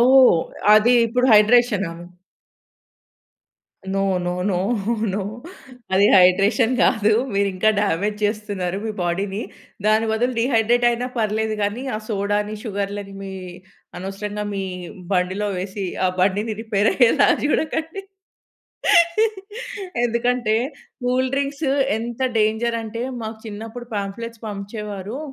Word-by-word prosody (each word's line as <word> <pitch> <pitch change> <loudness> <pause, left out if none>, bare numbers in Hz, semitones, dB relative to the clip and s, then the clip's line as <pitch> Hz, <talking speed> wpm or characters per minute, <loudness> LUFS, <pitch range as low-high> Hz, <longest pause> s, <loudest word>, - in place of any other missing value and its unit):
ఓహ్! 255 -4 +7 0.4
అది 225 +3 +5
ఇప్పుడు 250 +3 +1
హైడ్రేషనా? 215 -4 +4 2.0
No, 195 - +1 0.2
no, 175 - 0 0.2
no, 185 - 0 0.6
no 200 0 -1 0.7
అది 195 +2 +5
హైడ్రేషన్ 200 +6 +4
గాదు. 220 -3 +3 0.2
మీరింకా 200 +1 +2
డ్యామేజ్‌ 205 +1 0
జేస్తున్నారు, 205 -3 -2
మీ 220 - -2
బాడీని. 195 +4 -2 0.4
దాని 215 +1 +3
బదులు 245 +3 0
డీహైడ్రేట్ 240 0 +2
అయినా 240 +1 -2
పర్లేదు 220 0 0
గానీ, 205 +5 -1
ఆ - - -2
సోడాని, 205 0 -1
షుగర్లని 200 -1 -4
మీ 195 -1 -6 0.7
అనవసరంగా 205 +3 -5
మీ 195 -1 -2 0.5
బండిలో 190 +2 0
వేసి, 190 +2 -4 0.2
ఆ - - +4
బండిని 205 +4 +1
రిపేర్ 215 -1 +1
అయ్యేలా 265 +3 +4 0.2
జూడకండి. 320 +4 -1 2.0
ఎందుకంటే, 235 -1 +1 0.5
కూల్ 255 +1 +1
డ్రింక్సు 280 +1 -1 0.3
ఎంత 235 +2 -5 0.2
డేంజర్ 220 +2 +1
అంటే, 225 +1 -5 0.2
మాకు 220 0 -6
చిన్నప్పుడు 225 +3 -8
పాంఫ్లెట్స్ 220 +3 -5
పంచేవారు. 205 +2 -6
215 Hz, 105 wpm, -21 LUFS, 200-235 Hz, 2.0 s, ఓహ్